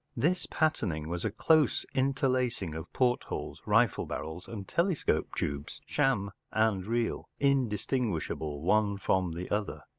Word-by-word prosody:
This 165 +9 +1
patterning 90 - 0
was 85 0 -3
a 110 - +1
close 155 +8 +3
interlacing 130 - +1
of 80 +2 -7
portholes, 125 -1 -1
rifle - - +3
barrels, 80 +3 -5
and 100 -4 -7
telescope 170 - 0
tubes— 70 0 -3
sham 130 -9 +1 0.2
and 110 -3 +2
real—indistinguishable 115 - -1
one 100 +2 +3
from 95 -3 +1
the 85 +2 -5
other. 105 0 -2
110 Hz, 120 wpm, -30 LUFS, 90-130 Hz, 0.2 s, close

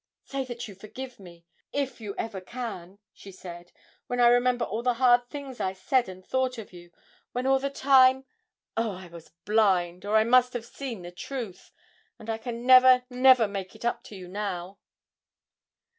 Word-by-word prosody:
'Say 275 0 -4
that 240 -2 -6
you 205 - -10
forgive 240 +6 -9
me 170 -3 -14 0.3
if 275 -4 -3
you 205 -2 -6
ever 205 -4 -4
can!' 200 -4 -7 0.2
she 195 - -12
said, 175 -2 -11 0.4
'when 245 - -3
I 240 -1 +7
remember 245 0 +3
all 220 +4 -3
the 245 0 +1
hard 245 0 +4
things 280 -3 -8
I 190 - -1
said 245 +4 0
and 185 0 -11
thought 260 -1 -1
of 220 -4 -9
you, 175 -1 -13 0.4
when 250 +1 -2
all 270 0 +3
the 275 +1 -2
time 265 -1 +4 0.5
oh, 225 -2 -1
I 185 0 -10
was 170 -1 -13 0.2
blind, 185 -5 +2
or 210 +2 +2
I 220 - +5
must 250 +2 +4
have 240 -2 -4
seen 235 -5 -7
the 175 - -8
truth! 225 0 -7 0.5
And 220 +1 -6
I 225 - -3
can 235 0 -6
never, 255 0 +7
never 255 -2 +5
make 195 0 -6
it 220 - -9
up 240 - 0
to 210 - -11
you 185 -2 -9
now!' 190 -1 -5
230 Hz, 190 wpm, -27 LUFS, 190-255 Hz, 0.5 s, I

